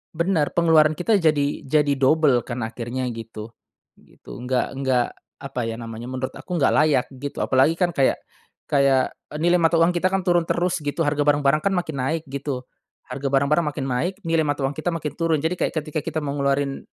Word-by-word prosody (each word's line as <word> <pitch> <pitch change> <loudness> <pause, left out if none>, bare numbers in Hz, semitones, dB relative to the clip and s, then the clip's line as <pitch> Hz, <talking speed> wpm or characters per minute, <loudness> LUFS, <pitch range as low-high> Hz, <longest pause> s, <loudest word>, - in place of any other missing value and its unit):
Benar, 170 -3 0
pengeluaran 155 -2 +4
kita 200 +5 +2
jadi 145 -4 0
jadi 150 0 +3
double 140 -2 +4
kan 120 -1 -4
akhirnya 120 +3 -4
gitu, 115 -1 -8 0.5
gitu. - - -13
Nggak 125 0 0
nggak 130 -3 +1 0.3
apa 135 -2 -6
ya 115 - -3
namanya 115 0 -7
menurut 130 0 -4
aku 180 -2 -5
nggak 140 - +3
layak 150 -4 +3
gitu 140 +2 -7
apalagi 135 +5 +3
kan 175 -2 +1
kayak 135 - +2 0.5
kayak 140 -2 +2 0.3
nilai 175 +2 +3
mata 165 0 +3
uang 165 +2 +4
kita 180 +2 +1
kan 190 0 -1
turun 175 -2 +2
terus 175 -1 0
gitu 145 +2 -1
harga 145 0 0
barang-barang 145 +1 +3
kan 200 -1 0
makin 160 -4 -2
naik 160 +5 -1
gitu, 135 -1 -4 0.4
harga 135 +2 -4
barang-barang 140 +4 +2
makin 145 -2 -3
naik 135 +9 -1
nilai 165 -2 +1
mata 145 -1 -1
uang 135 +2 0
kita 155 +3 -3
makin 150 -2 -3
turun 165 -2 +1
jadi 160 - +1
kayak - - 0
ketika 155 0 -2
kita 155 - -3
mau 140 -1 -2
ngeluarin 140 0 0
145 Hz, 190 wpm, -23 LUFS, 130-165 Hz, 0.5 s, pengeluaran